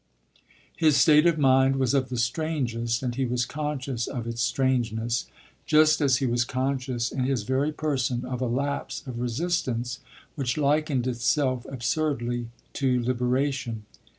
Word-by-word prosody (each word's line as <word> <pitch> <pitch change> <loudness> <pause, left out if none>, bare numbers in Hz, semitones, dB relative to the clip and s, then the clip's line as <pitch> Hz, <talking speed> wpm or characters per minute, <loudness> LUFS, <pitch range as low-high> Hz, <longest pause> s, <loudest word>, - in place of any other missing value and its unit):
His 155 -3 +3
state 155 +1 +6
of 170 -2 +2
mind 135 -1 +4
was 130 -1 +1
of 130 -2 +1
the 125 - -3
strangest 120 -3 -1
and 125 -1 -1
he 135 +2 -1
was 120 0 0
conscious 140 -5 -3
of 120 -3 -4
its 115 0 -3
strangeness, 120 -3 0 0.4
just 155 0 +5
as 135 -3 +4
he 135 - -1
was 120 -1 +2
conscious 130 -1 -2
in 130 -2 -1
his 130 -5 0
very 135 +6 0
person 130 -5 -1
of 125 0 -4
a 130 - 0
lapse 140 +4 -2
of 125 -3 -6
resistance 125 -2 -2 0.3
which 130 -3 -2
likened 145 -3 +1
itself 125 +1 0
absurdly 120 -2 -1 0.3
to 130 -3 +1
liberation. 125 -2 -1
130 Hz, 150 wpm, -26 LUFS, 120-140 Hz, 0.4 s, state